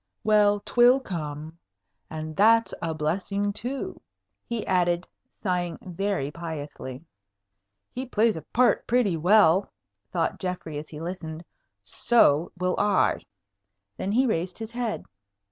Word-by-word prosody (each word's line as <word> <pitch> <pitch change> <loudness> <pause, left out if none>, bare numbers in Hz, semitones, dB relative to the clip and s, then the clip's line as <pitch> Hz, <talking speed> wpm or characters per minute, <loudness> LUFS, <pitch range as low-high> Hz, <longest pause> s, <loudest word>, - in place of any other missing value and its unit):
Well, 205 -1 +4
'twill 245 +4 +5
come. 160 - -6 0.5
And 155 0 -6
that's 225 +4 +4
a 165 -1 -2
blessing 200 +6 -1
too," 265 - -5 0.5
he 235 -2 -3
added, 175 -2 +1 0.4
sighing 175 -3 -1
very 185 -5 -2
piously. 150 -4 -7 0.9
"He 255 +1 -5
plays 225 -2 +2
a 160 - -5
part 250 +8 +2
pretty 235 -7 +2
well," 185 +2 +4 0.4
thought 165 +6 -1
Geoffrey 180 -5 -4
as 150 - -10
he 150 - -8
listened. 165 -1 -6 0.4
"So 170 -9 +3
will 180 0 0
I." 205 -2 +3 0.8
Then 195 - -3
he 255 +4 +4
raised 180 -6 -1
his 225 0 -6
head. 240 -2 -3
185 Hz, 125 wpm, -26 LUFS, 160-220 Hz, 0.9 s, twill